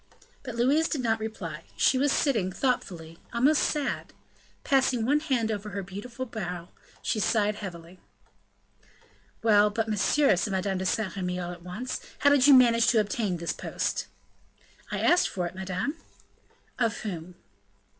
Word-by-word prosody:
But 250 -4 -7
Louise 280 +7 +2
did 290 - -1
not 225 -1 +1
reply; 175 -8 -6
she 260 - +3
was 285 +1 +3
sitting, 220 -13 +1
thoughtfully, 175 -9 -2
almost 270 +6 +3
sad; 295 -2 -1 0.5
passing 260 -4 +2
one 290 +4 +3
had 245 -7 0
over 210 0 -4
her 200 0 -4
beautiful 210 +7 -7
brow, 180 -7 -6 0.3
she 215 - 0
sighed 210 0 +1
heavily. 180 -3 -9 1.4
"Well, 210 -2 +5
but, 225 +2 -2
monsieur," 215 +3 +3
said 200 +2 -1
Madame 190 0 -1
de 190 - -1
Saint 210 0 -1
Remy, 180 -1 -2
all 175 0 -4
at 175 -1 -10
once, 185 +9 -5 0.2
"how 285 - +4
did 285 -1 +5
you 285 - +9
manage 235 -2 +5
to 230 -1 +4
obtain 205 -3 -1
this 170 0 -2
post?" - - -3 0.8
"I - - -2
asked 355 - +4
for 180 -2 -3
it, 175 - -5
madame." 190 - -3 0.8
"Of 230 -3 0
whom?" 180 -4 -6
215 Hz, 155 wpm, -27 LUFS, 185-255 Hz, 1.4 s, you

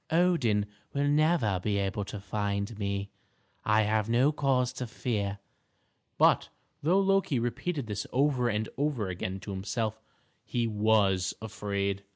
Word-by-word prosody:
Odin 160 - +3 0.3
will 140 0 +2
never 145 - +3
be 100 +1 0
able 100 +1 -1
to 105 - -6
find 100 +1 -2
me; 100 0 -2 0.5
I 110 0 +4
have 110 +1 +1
no 125 +5 +4
cause 130 -4 +1
to 125 0 -4
fear." 100 -4 -2 0.8
But - - +4 0.3
though 175 +6 +3
Loki 195 -7 +2
repeated 130 +5 -2
this 105 -2 -4
over 130 -2 +2
and 110 0 -1
over 140 -9 0
again 95 +1 -4
to 105 - -6
himself, 110 +3 -2 0.4
he 120 -1 -1
was 105 -4 +2
afraid. 100 -2 -2
110 Hz, 140 wpm, -29 LUFS, 100-130 Hz, 0.8 s, I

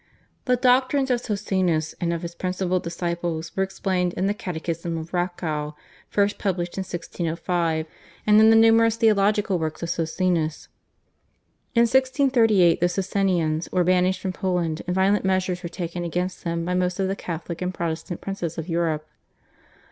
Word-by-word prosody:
The 250 - +3
doctrines 260 +2 +3
of 240 -1 +1
Socinus 185 -8 0
and 170 -1 0
of 170 0 -3
his 170 0 -5
principal 185 0 -1
disciples 170 -1 -3
were 195 - 0
explained 185 -2 -1
in 185 - 0
the 200 - +1
/Catechism 170 -3 -4
of 160 +1 -8
Racow/ 160 -4 -2 0.3
(first 205 0 +1
published 180 -3 -2
in 195 - -2
1605) 170 -2 -2 0.4
and 210 0 +6
in 220 0 +7
the 225 - +6
numerous 225 0 +5
theological 210 -3 +2
works 160 +1 -3
of 170 - -2
Socinus. 165 -1 -1 1.1
In 235 - +5
1638 235 - +4
the 175 - +2
Socinians 180 -4 0
were 180 - +2
banished 185 +1 +2
from 190 -1 -2
Poland, 175 -4 -1
and 180 - -1
violent 195 +2 +3
measures 185 -1 0
were 170 - -5
taken 175 0 -4
against 180 +2 -3
them 170 -1 -2
by 180 - -1
most 180 0 0
of 190 - +1
the 195 - -1
Catholic 170 -2 -6
and 180 0 -1
Protestant 170 0 -4
princes 180 -4 -4
of 165 0 -4
Europe. 165 -3 -1
180 Hz, 160 wpm, -24 LUFS, 170-195 Hz, 1.1 s, in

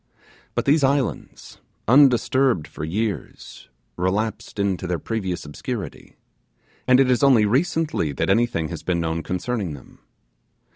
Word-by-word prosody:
But - - -1
these 145 +1 +3
islands, 135 -1 -2 0.3
undisturbed 130 - +4
for - - -8
years, 100 +6 -4 0.3
relapsed 105 +5 -2
into 95 -3 -1
their 90 0 -1
previous 95 -1 -4
obscurity; 75 - -7 0.7
and 130 0 +6
it 130 -2 +4
is 125 - +2
only 130 -6 +5
recently 155 - 0
that - - -1
anything 95 -6 +1
has 85 -3 -6
been 90 -2 -1
known 80 0 -2
concerning 90 -1 -3
them. 65 - -16
110 Hz, 130 wpm, -22 LUFS, 90-130 Hz, 0.7 s, and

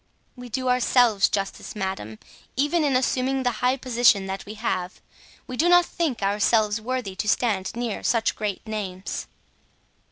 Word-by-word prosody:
"We 250 -1 -10
do 255 +2 -2
ourselves 245 -4 +4
justice, 195 +1 -3
madame, 190 - -4 0.4
even 295 +5 +1
in 280 -3 +2
assuming 260 +1 +1
the 245 - +2
high 255 +2 +2
position 240 -6 +3
that 190 +1 -5
we 210 - -7
have. 185 -5 -3 0.5
We 255 - -6
do 335 +6 +3
not 355 0 +6
think 300 -13 -2
ourselves 210 +2 +2
worthy 240 -4 -3
to 210 - -3
stand 210 -5 0
near 235 -3 -3
such 230 -2 +1
great 210 -3 -4
names." 200 -4 -5
230 Hz, 155 wpm, -24 LUFS, 200-255 Hz, 0.5 s, not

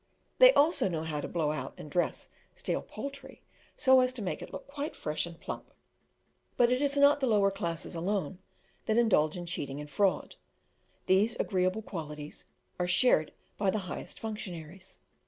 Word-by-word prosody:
They - - +10
also 310 - +4
know 160 -3 -2
how 155 -2 -3
to - - -4
blow 155 -3 0
out 155 - -5
and - - -9
dress 175 +2 -1 0.3
stale - - -2
poultry, 275 -1 -8 0.3
so 260 0 +6
as 255 0 +3
to 240 -4 -5
make 180 - -3
it - - -8
look - - -7
quite 285 +1 -5
fresh 150 +3 -2
and 170 -1 -11
plump. - - -7 0.9
But 240 0 +4
it 250 +2 +2
is 285 0 +1
not 285 +1 +6
the 265 - +1
lower 205 -3 +4
classes 170 -5 -4
alone 180 0 -2 0.5
that 220 0 +2
indulge 185 -9 +3
in 175 - -5
cheating 145 -5 -4
and 150 - -7
fraud; 195 +2 0 0.7
these 205 +5 +3
agreeable 185 +2 0
qualities 150 -6 -7 0.3
are 180 - 0
shared 180 -4 +4 0.3
by 200 -2 +2
the 215 - +1
highest 180 - -7
functionaries. 190 -4 -7
195 Hz, 175 wpm, -30 LUFS, 165-250 Hz, 0.9 s, They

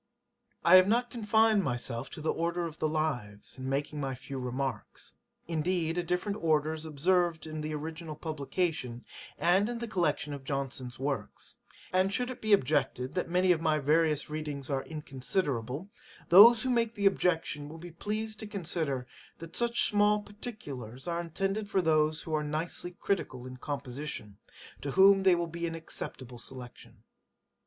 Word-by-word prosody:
I 175 +2 +9
have 185 0 +6
not 240 +3 +2
confined 220 -2 +3
myself 120 -2 -2
to - - -8
the 155 - 0
order 170 +1 -1
of 165 -1 -7
the 155 - +1
Lives, 130 -9 -3
in 130 0 -4
making 145 +2 -2
my 135 -1 -2
few 135 +1 -7
remarks. 130 +1 -4 0.3
Indeed 165 0 0
a 175 - +1
different 180 +4 -2
order 155 -1 +2
is 160 0 -6
observed 170 +2 +1
in 155 -1 -5
the 155 0 -3
original 160 +1 -6
publication, 150 -5 -2 0.3
and 190 +5 +3
in 240 - -3
the 235 0 -4
collection 160 -7 0
of 140 -2 -7
Johnson's 135 -2 -4
Works. 140 +1 -4 0.4
And 185 +1 +3
should 250 +4 0
it 255 - -9
be 215 - -1
objected, 135 -5 +2
that 180 -1 -2
many 180 +1 +3
of 165 -2 +2
my 155 -2 +2
various 150 +1 +2
readings 150 -2 -4
are 135 -1 0
inconsiderable, 145 - -3 0.4
those 220 +6 +9
who 260 - +1
make 230 -2 +1
the 200 - -1
objection 165 -6 +1
will 160 - -9
be 175 +1 -9
pleased 215 +5 -4
to 215 - -6
consider, 160 -9 -2 0.3
that 165 0 -10
such 235 0 +2
small 210 0 +3
particulars 145 - -8
are 170 0 -1
intended 195 +5 -2
for 195 - +2
those 155 -1 +2
who 160 - -5
are 155 -1 +1
nicely 155 +4 -3
critical 130 -10 -2
in 130 0 -8
composition, 135 -6 -5 0.4
to 140 - -3
whom 195 +1 +7
they 190 -2 +5
will 170 0 0
be 170 +1 -4
an 165 - -4
acceptable 130 -6 -7
selection. 125 0 -9
160 Hz, 170 wpm, -30 LUFS, 140-190 Hz, 0.4 s, I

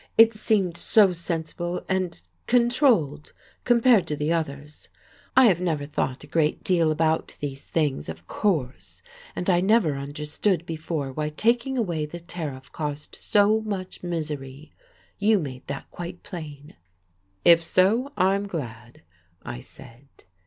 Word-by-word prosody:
"It 225 0 +8
seemed 205 -5 0
so 200 +2 +5
sensible 170 +1 -4
and 185 - -1 0.3
controlled, 240 - +2 0.3
compared 235 -4 +4
to 150 - -2
the 150 +3 0
others. 150 -2 -5 0.5
I 260 - +9
have 185 -6 +4
never 160 -5 -1
thought 135 -3 -2
a - - -11
great 155 -2 0
deal 170 -4 +2
about 160 +1 0
these 140 -2 -5
things, 145 - -1
of 80 +2 -8
course, 150 - -2 0.3
and 180 - -3
I 175 -2 +4
never 190 -6 +3
understood 150 +6 -2
before 155 -4 -4
why 150 +2 -2
taking 235 - +1
away 170 -10 -1
the 170 +3 -8
tariff 155 -6 -7
caused 150 -1 -5
so 210 +1 +3
much 200 -4 -5
misery. 150 -4 -5 0.5
You 210 +1 +4
made 135 -8 -6
that 140 0 -6
quite 175 0 -7
plain. 155 -7 -9 0.7
"If 170 -1 +7
so, 215 - +2
I'm 195 +2 +2
glad," 120 - -7 0.4
I - - -6
said. 115 - -14
165 Hz, 140 wpm, -25 LUFS, 145-195 Hz, 0.7 s, I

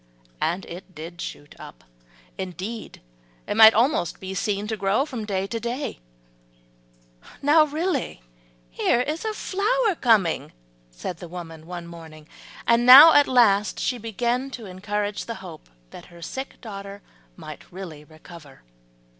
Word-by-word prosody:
And 180 +3 -1
it 180 +1 -11
did 170 +3 -9
shoot 145 - -8
up, - - -12 0.5
indeed 190 +5 -7 0.4
it - - -3
might 220 0 +8
almost 230 - +1
be 190 0 -6
seen 200 +1 -2
to 220 +1 -3
grow 205 +6 +1
from 245 -8 -6
day 195 -2 -2
to 230 +3 -4
day. 240 +5 -4 1.4
"Now 305 +2 +5
really 310 - -3 0.5
here 235 - +1
is 305 +5 -3
a 435 - -1
flower 430 +3 0
coming," 220 - +1 0.4
said - - -7
the 175 - -9
old 170 - -16
woman 165 -2 -9
one 175 -1 -7
morning, 160 -2 -12 0.4
and 235 +1 +3
now 275 +6 +11
at 290 -1 +5
last 210 -5 +3
she 250 - -1
began 240 +4 -2
to 245 -4 -8
encourage 205 +2 -4
the 230 - -5
hope 170 - -11 0.2
that - - -11
her 170 -1 -14
sick 265 +8 -7
daughter 200 -3 -9 0.3
might - - -11
really 175 -5 -9
recover. 155 - -15
205 Hz, 145 wpm, -24 LUFS, 175-245 Hz, 1.4 s, now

